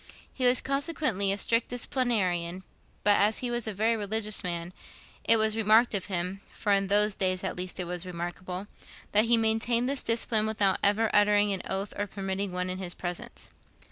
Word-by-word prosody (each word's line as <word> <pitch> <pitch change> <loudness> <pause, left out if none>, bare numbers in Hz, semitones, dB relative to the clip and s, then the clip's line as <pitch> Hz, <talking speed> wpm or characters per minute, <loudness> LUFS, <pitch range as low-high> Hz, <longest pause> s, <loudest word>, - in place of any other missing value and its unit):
He 255 -1 +1
was 250 +1 +3
consequently 275 - 0
a 200 - -1
strict 230 +3 +1
disciplinarian; 190 -8 -1 0.4
but, 205 -1 +4
as 210 +2 +3
he 240 - -2
was 240 -2 -1
a - - -1
very 220 +3 +1
religious 215 0 0
man, 170 -1 -3 0.5
it 230 - +5
was 220 0 +2
remarked 225 +2 +4
of 195 -3 -1
him 185 0 -3
(for 205 - -2
in 195 -1 +3
those 210 +1 +3
days, 185 -1 -1
at 190 - -3
least, 180 +1 -6
it 180 - -2
was 175 0 -4
remarkable) 180 +1 -6 0.5
that 210 +2 +5
he 235 0 +4
maintained 225 +2 +1
this 275 0 -2
discipline 225 -1 +1
without 205 -3 +1
ever 215 +2 +3
uttering 205 0 +4
an 190 - -3
oath 195 +1 -2
or 205 - -1
permitting 195 0 -4
one 180 0 -2
in 185 - -5
his 180 -2 -3
presence. 175 -1 -6
205 Hz, 190 wpm, -28 LUFS, 185-225 Hz, 0.5 s, it